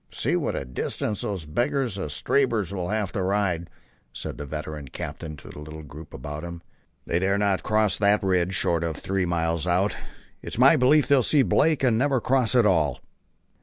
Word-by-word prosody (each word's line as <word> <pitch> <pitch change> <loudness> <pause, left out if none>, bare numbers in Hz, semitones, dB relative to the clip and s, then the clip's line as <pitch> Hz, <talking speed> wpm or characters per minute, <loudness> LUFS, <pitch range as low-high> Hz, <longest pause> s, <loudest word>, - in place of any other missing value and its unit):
"See - - -1
what - - -1
a - - -3
distance 65 +11 -3
those 95 -6 -4
beggars 120 - -1
of 75 -6 -4
Stabber's 110 - 0
will 90 -2 -3
have 105 -3 -1
to 95 - -2
ride," 90 -3 0 0.4
said - - -6
the 75 - -5
veteran 75 -1 -6
captain 75 +4 -6
to - - -12
the - - -10
little 75 +1 -9
group 75 +2 -11
about 75 +4 -6
him. 85 -1 -7 0.4
"They 85 - 0
dare 95 +2 +1
not 100 -2 +1
cross 110 -1 +1
that 100 +1 +3
ridge 95 -1 +1
short 85 -2 +2
of 80 -2 -2
three 95 -2 -1
miles 85 0 -1
out. 90 +4 +1 0.5
It's - - -7
my - - +7
belief 145 +4 +4
they'll 140 -2 +5
see 140 +3 +3
Blake 155 0 +2
and 115 -4 +3
never 135 0 +2
cross 125 0 +1
at 120 -3 +5
all." 80 -9 +2
95 Hz, 195 wpm, -25 LUFS, 80-110 Hz, 0.5 s, my